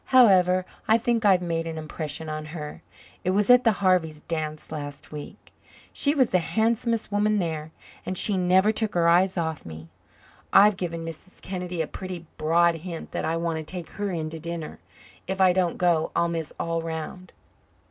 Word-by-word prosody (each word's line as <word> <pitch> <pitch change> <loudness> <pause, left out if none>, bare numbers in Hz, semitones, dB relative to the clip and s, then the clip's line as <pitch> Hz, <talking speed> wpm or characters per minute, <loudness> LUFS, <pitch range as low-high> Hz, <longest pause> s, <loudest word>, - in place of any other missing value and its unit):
However, 185 -7 +5 0.2
I 220 - +5
think 230 -1 0
I've 185 -3 +5
made 165 -1 -2
an 160 -1 -5
impression 155 0 -5
on 155 0 -4
her. 150 -1 -7 0.4
It 180 - 0
was 205 +5 +3
at 250 0 +7
the 230 - +5
Harvey's 180 -6 +1
dance 155 -2 -4
last 145 -2 -7
week. 150 -1 -10 0.4
She 285 +1 +1
was 260 -5 +3
the 185 - +4
handsomest 225 +6 0
woman 210 +1 +2
there, 160 -4 -2 0.3
and 185 - -3
she 205 - +4
never 185 +3 +4
took 220 -2 -2
her 170 -1 +3
eyes 180 +3 +4
off 160 -2 -2
me. 80 0 -10 0.6
I've 205 +1 +7
given 170 -3 -4
Mrs. 165 +3 -10
Kennedy 180 -3 -3
a - - -6
pretty 185 -3 -7
broad 170 +2 +3
hint 170 0 -7
that - - -3
I 165 - 0
want 165 -1 -1
to 160 - -4
take 175 +2 -7
her 205 -1 -3
in 160 -4 -3
to 160 - -7
dinner. 170 -1 -6 0.5
If 190 0 -3
I 185 -1 +5
don't 180 -2 0
go 170 -3 +2
I'll 170 0 +2
miss 165 -2 -3
all 165 0 -1
round." 165 +3 -6
175 Hz, 190 wpm, -25 LUFS, 160-190 Hz, 0.6 s, at